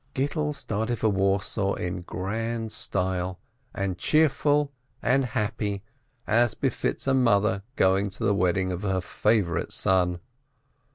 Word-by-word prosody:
Gittel 150 +2 -1
started 110 0 -2
for 110 - +2
Warsaw 100 0 +1
In 90 0 -3
grand 110 +5 -3
style, 95 -2 -1 0.3
and 95 -2 -3
cheerful 150 -1 +3 0.3
and 135 +2 +2
happy, 105 -3 -2 0.4
as 120 +1 +3
befits - - -1
a 135 - +2
mother 110 -5 +3
going 95 -1 +3
to 95 - -7
the 100 - +3
wedding 95 -1 +1
of 90 0 -4
her 95 -2 0
favorite 95 -1 0
son. 90 -2 +2
100 Hz, 125 wpm, -26 LUFS, 95-115 Hz, 0.4 s, cheerful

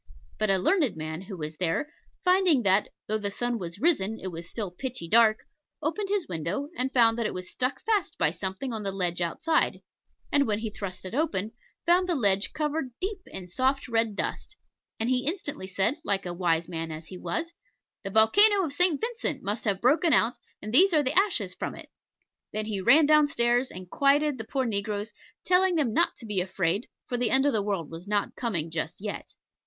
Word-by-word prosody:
But 215 - +1
a 195 - +3
learned 280 - +1
man 155 +2 -5
who 190 0 -8
was 155 -1 -6
there, 185 - -1 0.3
finding 360 -8 +4
that, 195 +1 +3 0.2
though 215 +1 -1
the 205 -1 -2
sun 240 +3 -2
was 170 -1 -6
risen, 225 - +1
it 185 - -5
was 170 0 -7
still 205 -6 -5
pitchy 235 -2 -5
dark, 220 +2 +4 0.4
opened 325 +7 -2
his 400 -5 0
window, 175 - -3
and 260 -3 -1
found 230 -3 +3
that 230 - 0
it - - -6
was 185 0 -5
stuck 255 +2 -2
fast 430 -3 0
by - - +2
something 195 +7 -5
on 220 - -4
the 200 -1 -2
ledge 180 -2 -2
outside, 315 - 0 0.5
and, 285 -1 +3
when 210 -1 +1
he 220 0 -4
thrust 190 -3 -7
it 185 - -7
open, 265 - -1 0.3
found 360 +2 +3
the 350 - +2
ledge 200 -6 +2
covered 300 -2 -2
deep 395 +2 -3
in 185 -2 -6
soft 260 +8 0
red 225 -3 0
dust; 415 - -4 0.4
and 225 - 0
he 255 +1 0
instantly 300 - -2
said, 195 - 0
like 195 -7 -1
a 175 - -4
wise 170 -2 0
man 165 -2 -5
as 155 +1 -8
he 185 - -9
was, 335 0 -3 0.5
"The 195 - -4
volcano 390 - +7
of 285 - -4
St. 355 -1 +6
Vincent 445 - -2
must 205 +3 -3
have 200 -3 0
broken 305 +6 +3
out, 240 0 +3 0.3
and 215 +2 -6
these 365 +6 +6
are 300 - +4
the 260 +1 +1
ashes 320 - +1
from - - -5
it." - - -11 0.6
Then 215 0 -2
he 210 -3 -3
ran 300 +11 +6
down 305 0 +5
stairs 240 -1 +1
and 185 0 -9
quieted 280 +4 +2
the 225 - -5
poor 265 +2 -1
negroes, 210 0 -2 0.3
telling 365 0 +3
them 275 -9 +1
not - - +2
to - - -11
be 205 -4 -1
afraid, 190 +2 -1 0.2
for 245 - -3
the 240 -2 +1
end 265 +4 +3
of 285 - +2
the 215 - +1
world 195 -7 -3
was 165 +4 -9
not 205 0 -1
coming 170 -10 -3
just 160 -1 -4
yet. 210 +1 -6
225 Hz, 210 wpm, -27 LUFS, 190-290 Hz, 0.6 s, volcano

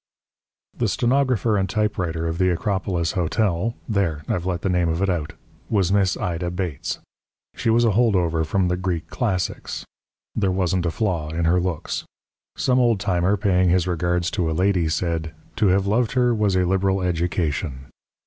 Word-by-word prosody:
The - - 0
stenographer 125 -4 +2
and 95 -1 0
typewriter 95 -7 -1
of 80 +1 -3
the 90 0 +3
Acropolis 90 -2 -1
Hotel 95 +4 0
(there! 90 -8 0
I've 90 0 -1
let 90 -2 -2
the - - +1
name 90 -2 +2
of 80 +1 -1
it 95 0 +1
out!) 80 -4 -3 0.4
was 95 -4 +2
Miss 100 -2 +2
Ida 85 0 -2
Bates. 90 -5 -3 0.6
She - - -1
was 120 +1 +4
a 115 - +4
hold 110 0 +3
over 85 -3 +1
from 95 +3 +1
the 90 0 0
Greek 85 -3 -3
classics. 95 -7 -2 0.5
There 100 -3 +1
wasn't 90 -1 0
a - - 0
flaw 85 -7 -1
in 85 +1 -1
her 90 +2 +3
looks. 90 -3 -3 0.5
Some 130 0 +2
old 120 -4 +3
timer 95 0 +1
paying 95 -2 +2
his 90 0 +3
regards 90 0 0
to 85 -3 0
a - - -1
lady 90 -3 +2
said: 80 -1 -2 0.2
"To 110 - +3
have 95 +1 +3
loved 110 +3 +1
her 125 -2 +3
was 105 -4 +1
a 90 0 +3
liberal 95 +1 +1
education." 85 -5 -1
90 Hz, 175 wpm, -23 LUFS, 85-100 Hz, 0.6 s, was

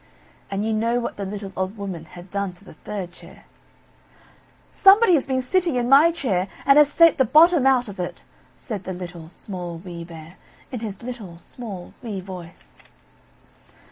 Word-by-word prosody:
And 200 +1 -2
you 220 - 0
know 230 +3 +1
what 235 - -4
the 200 - -4
little 195 0 -6
old 190 +3 -3
Woman 190 -5 -6
had 175 +3 -13
done 200 -2 -2
to 180 +3 -20
the - - -12
third 185 +2 -6
chair. - - -16 1.3
"Somebody 395 0 +6
has 290 -5 +2
been 260 -1 0
sitting 345 +2 +1
in 240 -1 0
my 285 +6 +7
chair 210 - -1 0.2
and 275 +1 +7
has 295 -1 +5
sate 330 0 +5
the - - +6
bottom 310 +2 +5
out 255 -2 +3
of 200 -2 -9
it!" 175 - -5 0.3
said 210 -6 -5
the 185 - -4
Little, 175 -2 -8
Small, 175 -2 -7
Wee 170 -1 -8
Bear, 165 +1 -12 0.3
in 250 - -4
his 210 -2 -7
little, 225 -9 -7
small, 195 -1 -9
wee 215 -6 -5
voice. 180 -3 -11
205 Hz, 175 wpm, -23 LUFS, 180-260 Hz, 1.3 s, my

